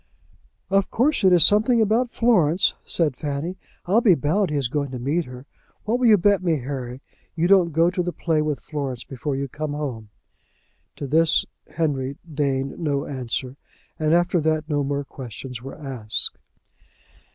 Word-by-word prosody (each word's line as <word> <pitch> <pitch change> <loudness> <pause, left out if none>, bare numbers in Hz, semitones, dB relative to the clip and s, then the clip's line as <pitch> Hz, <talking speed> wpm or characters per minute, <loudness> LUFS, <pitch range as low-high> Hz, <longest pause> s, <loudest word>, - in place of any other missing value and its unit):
"Of 195 0 +2
course 255 0 +1
it 190 - +5
is 175 -4 +7
something 220 +4 +5
about 225 +3 +2
Florence," 190 -9 +2
said 155 -6 +2
Fanny. 150 +7 -4 0.3
"I'll 205 +6 +3
be 200 -7 +5
bound 165 +8 0
he 150 - -3
is 140 -4 0
going 140 +2 -2
to 130 - -6
meet 145 +7 -1
her. 125 +1 -11 0.4
What 235 +3 0
will 250 - +3
you 215 -2 +7
bet 200 +1 +2
me, 170 -4 +1
Harry, 130 -1 -6 0.3
you 170 +1 +1
don't 185 -3 +4
go 165 +3 +3
to 180 - -1
the 175 0 -2
play 160 -3 0
with 150 -3 -2
Florence 135 -5 -5
before 135 +2 -4
you 140 +1 -3
come 150 +2 -5
home?" 130 -8 -5 0.9
To 145 - -6
this 160 +4 +3 0.3
Henry 140 -4 -1
deigned 140 -3 -2
no 145 -4 -1
answer; 130 0 -4 0.4
and 155 -1 +1
after 175 0 +2
that 155 0 0
no 145 -2 0
more 140 +1 -2
questions 125 -2 -9
were 135 +2 -9
asked. 125 -7 -1
150 Hz, 175 wpm, -23 LUFS, 135-175 Hz, 0.9 s, is